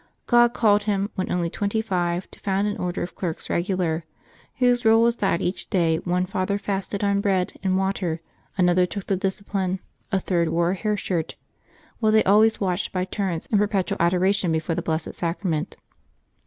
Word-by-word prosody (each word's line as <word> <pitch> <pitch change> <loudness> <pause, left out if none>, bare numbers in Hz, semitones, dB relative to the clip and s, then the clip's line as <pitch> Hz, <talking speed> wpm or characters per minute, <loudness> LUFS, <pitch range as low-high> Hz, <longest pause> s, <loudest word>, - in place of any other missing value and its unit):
God 240 -1 +4
called 210 -2 +3
him, 200 -1 0
when 185 - -3
only 175 -1 0
twenty 205 +2 -1
five, 180 -4 -1
to - - -15
found 195 0 0
an 205 - -1
Order 180 0 -2
of 175 - -6
Clerks 170 -4 -4
Eegular, 175 -2 0 0.6
whose 245 -1 +3
rule 225 0 +5
was 235 0 +2
that 195 -4 0
each 180 - -3
day 165 -4 +2
one 180 +2 0
father 185 +2 -1
fasted 200 0 -3
on 200 0 +2
bread 190 -3 +1
and 190 -1 +1
water, 190 -4 -1 0.4
another 180 -1 +3
took 200 +2 -6
the 195 - +1
discipline, 190 -1 -2 0.3
a 195 - +2
third 170 -3 0
wore 170 +2 +1
a - - -1
hair 210 +2 -1
shirt, 170 -4 -2 0.6
while 220 -2 +3
they 220 0 +5
always 215 +3 +4
watched 185 -1 -1
by 185 -1 -1
turns 185 -4 -3
in 210 - +4
perpetual 200 -2 0
adoration 185 +1 +2
before 160 +1 -1
the - - -2
Blessed 160 0 -2
Sacrament. 170 -1 -2
190 Hz, 180 wpm, -24 LUFS, 175-205 Hz, 0.6 s, rule